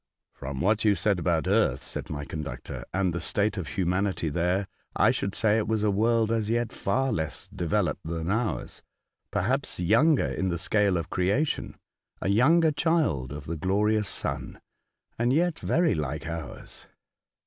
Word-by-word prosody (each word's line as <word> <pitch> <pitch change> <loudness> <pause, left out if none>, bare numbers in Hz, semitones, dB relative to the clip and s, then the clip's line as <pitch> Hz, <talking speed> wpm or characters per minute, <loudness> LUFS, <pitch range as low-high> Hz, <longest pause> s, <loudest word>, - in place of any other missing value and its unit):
" - - -59
From 65 0 -5
what 105 +4 +2
you 105 -2 +4
said 100 +1 +1
about 85 -1 +1
earth," 95 - +2
said - - -6
my 75 -1 -4
conductor, 70 -6 -6
" - - -50
and 95 -2 0
the 85 - -3
state 105 +1 0
of 95 -6 -4
humanity 95 -3 0
there, 90 +5 0 0.3
I - - +5
should 100 - -2
say 110 0 +3
it 110 - -2
was 110 -1 0
a 105 - +3
world 115 +2 +2
as 110 -2 0
yet 120 0 0
far 135 0 0
less 80 -7 -3
developed 85 -3 -1
than 85 +1 -2
ours 110 +1 -1 0.3
— - - -59 0.2
perhaps 115 +7 0
younger 130 - +4
in 95 - -1
the 85 - -1
scale 100 +1 +2
of 85 - -4
creation, 100 +12 0 0.4
a - - -1
younger 155 +10 +5
child 150 - +1
of 75 0 -7
the 85 - -3
glorious 105 +4 +1
sun, 70 - -3 0.6
and 120 +1 +2
yet 170 +4 +2
very 170 0 +2
like 75 -1 -3
ours. 85 -2 -7
100 Hz, 175 wpm, -27 LUFS, 85-115 Hz, 0.6 s, I